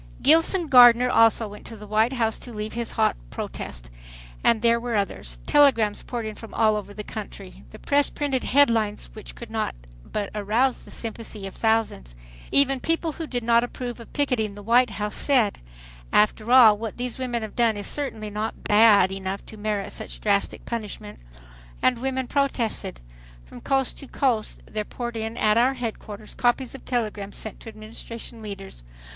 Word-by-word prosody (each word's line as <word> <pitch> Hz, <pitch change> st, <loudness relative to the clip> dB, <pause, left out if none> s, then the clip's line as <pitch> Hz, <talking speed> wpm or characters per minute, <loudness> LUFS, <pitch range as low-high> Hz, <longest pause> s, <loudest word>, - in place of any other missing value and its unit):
Gilson 330 Hz, +4 st, +5 dB
Gardner 250 Hz, -2 st, +7 dB
also 225 Hz, -1 st, +4 dB
went 205 Hz, 0 st, -11 dB
to 225 Hz, -, -9 dB
the 210 Hz, -, -10 dB
White 215 Hz, +4 st, +2 dB
House 225 Hz, -3 st, 0 dB
to 245 Hz, -, -10 dB
leave 215 Hz, -1 st, -5 dB
his 235 Hz, -1 st, -4 dB
hot -, -, +2 dB
protest. -, -, -7 dB, 0.5 s
And 230 Hz, -1 st, +3 dB
there 235 Hz, 0 st, +4 dB
were 235 Hz, -1 st, -3 dB
others. 200 Hz, -1 st, -2 dB
Telegrams 255 Hz, -8 st, +4 dB
poured 240 Hz, -2 st, -5 dB
in 215 Hz, -, -4 dB
from 225 Hz, +1 st, -11 dB
all 215 Hz, -1 st, +3 dB
over 205 Hz, -1 st, -5 dB
the 210 Hz, +1 st, -7 dB
country. -, -, -9 dB
The -, -, -12 dB
press 285 Hz, 0 st, +1 dB
printed 275 Hz, -3 st, -2 dB
headlines 225 Hz, -, +2 dB
which -, -, -9 dB
could -, -, -10 dB
not -, -, -2 dB, 0.3 s
but 205 Hz, -2 st, -4 dB
arouse 220 Hz, +5 st, 0 dB
the -, -, -13 dB
sympathy 225 Hz, -3 st, -7 dB
of 195 Hz, -, -7 dB
thousands. 220 Hz, -, -1 dB, 0.4 s
Even 270 Hz, -1 st, +4 dB
people 330 Hz, +3 st, 0 dB
who 320 Hz, +1 st, -6 dB
did 245 Hz, -4 st, -3 dB
not 235 Hz, 0 st, +4 dB
approve 245 Hz, 0 st, -5 dB
of 230 Hz, -, -12 dB
picketing 245 Hz, -8 st, 0 dB
the 205 Hz, -, -10 dB
White 240 Hz, +3 st, +4 dB
House 210 Hz, 0 st, -4 dB
said, 250 Hz, -8 st, +2 dB, 0.5 s
"After 215 Hz, +2 st, +2 dB
all, 225 Hz, -5 st, +8 dB
what 225 Hz, -2 st, -5 dB
these 250 Hz, 0 st, -4 dB
women 240 Hz, -3 st, -2 dB
have 215 Hz, -, -7 dB
done 230 Hz, -3 st, +2 dB
is 205 Hz, -, -4 dB
certainly 220 Hz, -7 st, -3 dB
not 215 Hz, +2 st, -4 dB
'bad' 210 Hz, -3 st, +5 dB
enough 195 Hz, 0 st, -5 dB
to -, -, -11 dB
merit 210 Hz, -1 st, -3 dB
such -, -, -6 dB
drastic 200 Hz, -1 st, 0 dB
punishment" 210 Hz, -, -6 dB, 0.6 s
And 250 Hz, -2 st, +2 dB
women 260 Hz, 0 st, -1 dB
protested. 245 Hz, -, -1 dB, 0.4 s
From 120 Hz, -, -12 dB
coast 270 Hz, -1 st, 0 dB
to 275 Hz, -, -10 dB
coast 245 Hz, -7 st, -1 dB
there 215 Hz, 0 st, -4 dB
poured 240 Hz, +2 st, -6 dB
in 225 Hz, +1 st, -4 dB
at 215 Hz, +1 st, +3 dB
our 260 Hz, +3 st, +3 dB
headquarters 220 Hz, -3 st, -6 dB
copies 245 Hz, +1 st, 0 dB
of 270 Hz, -, -11 dB
telegrams 210 Hz, -5 st, -3 dB
sent 220 Hz, -, -6 dB
to 225 Hz, -, -9 dB
Administration 225 Hz, +1 st, -10 dB
leaders. 195 Hz, -, -9 dB
225 Hz, 180 wpm, -24 LUFS, 210-250 Hz, 0.6 s, all